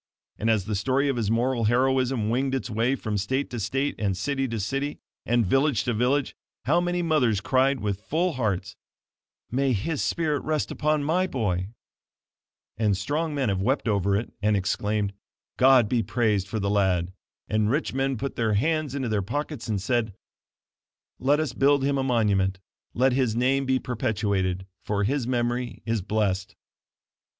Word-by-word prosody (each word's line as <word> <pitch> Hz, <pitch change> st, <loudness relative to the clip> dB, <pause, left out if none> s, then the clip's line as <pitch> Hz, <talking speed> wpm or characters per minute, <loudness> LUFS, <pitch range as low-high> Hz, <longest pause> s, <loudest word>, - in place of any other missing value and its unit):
And 110 Hz, -, 0 dB
as 110 Hz, -4 st, +2 dB
the 105 Hz, -, -3 dB
story 130 Hz, +8 st, +1 dB
of 135 Hz, -, 0 dB
his 110 Hz, -4 st, -1 dB
moral 120 Hz, +1 st, +1 dB
heroism 125 Hz, -1 st, +2 dB
winged 135 Hz, +2 st, 0 dB
its 130 Hz, -2 st, -3 dB
way 115 Hz, +5 st, +1 dB
from 110 Hz, -5 st, -3 dB
state 130 Hz, +8 st, -1 dB
to 120 Hz, -, -4 dB
state, 135 Hz, +7 st, -1 dB
and 100 Hz, -3 st, 0 dB
city 135 Hz, +1 st, -1 dB
to 115 Hz, -2 st, -3 dB
city, 135 Hz, +8 st, -2 dB, 0.3 s
and 120 Hz, -1 st, +3 dB
village 135 Hz, +4 st, +2 dB
to 120 Hz, -, -1 dB
village, 125 Hz, +5 st, +1 dB, 0.3 s
how 165 Hz, +7 st, +3 dB
many 175 Hz, 0 st, -1 dB
mothers 130 Hz, -, +2 dB
cried 130 Hz, +2 st, +2 dB
with 100 Hz, -1 st, -2 dB
full 165 Hz, +9 st, 0 dB
hearts: 110 Hz, -8 st, -2 dB, 0.8 s
"May 135 Hz, +1 st, +1 dB
his 140 Hz, +9 st, -2 dB
spirit 155 Hz, -4 st, 0 dB
rest 155 Hz, -1 st, -1 dB
upon 150 Hz, -1 st, 0 dB
my 180 Hz, +5 st, +1 dB
boy!" 95 Hz, -, -1 dB, 1.1 s
And 105 Hz, -4 st, +2 dB
strong 150 Hz, -, -2 dB
men 135 Hz, -5 st, 0 dB
have 95 Hz, -1 st, 0 dB
wept 130 Hz, +5 st, 0 dB
over 100 Hz, -2 st, +2 dB
it 110 Hz, -, -5 dB
and 105 Hz, 0 st, +2 dB
exclaimed: 105 Hz, +1 st, -1 dB, 0.4 s
"God 130 Hz, -3 st, +6 dB
be 120 Hz, +1 st, +1 dB
praised 110 Hz, -4 st, 0 dB
for 110 Hz, +3 st, -3 dB
the 100 Hz, 0 st, 0 dB
lad!" 95 Hz, -3 st, +1 dB, 0.3 s
And 105 Hz, +1 st, +1 dB
rich 145 Hz, +6 st, 0 dB
men 135 Hz, 0 st, 0 dB
put 135 Hz, +4 st, -4 dB
their 110 Hz, -2 st, +1 dB
hands 155 Hz, +4 st, 0 dB
into 135 Hz, -3 st, -2 dB
their 105 Hz, -2 st, +1 dB
pockets 145 Hz, +5 st, -4 dB
and 105 Hz, -3 st, -1 dB
said, 110 Hz, 0 st, -1 dB, 1.0 s
"Let 145 Hz, +4 st, +3 dB
us 155 Hz, -6 st, -1 dB
build 140 Hz, +1 st, +3 dB
him 140 Hz, 0 st, +1 dB
a -, -, 0 dB
monument; 100 Hz, -7 st, +1 dB, 0.4 s
let 130 Hz, +2 st, +3 dB
his 125 Hz, -4 st, +1 dB
name 130 Hz, +3 st, +1 dB
be 130 Hz, 0 st, +3 dB
perpetuated, 100 Hz, -6 st, -1 dB, 0.2 s
for 105 Hz, -1 st, -1 dB
his 130 Hz, +3 st, 0 dB
memory 120 Hz, 0 st, -1 dB
is 115 Hz, -2 st, 0 dB
blessed." 95 Hz, -1 st, -1 dB
120 Hz, 175 wpm, -26 LUFS, 105-135 Hz, 1.1 s, God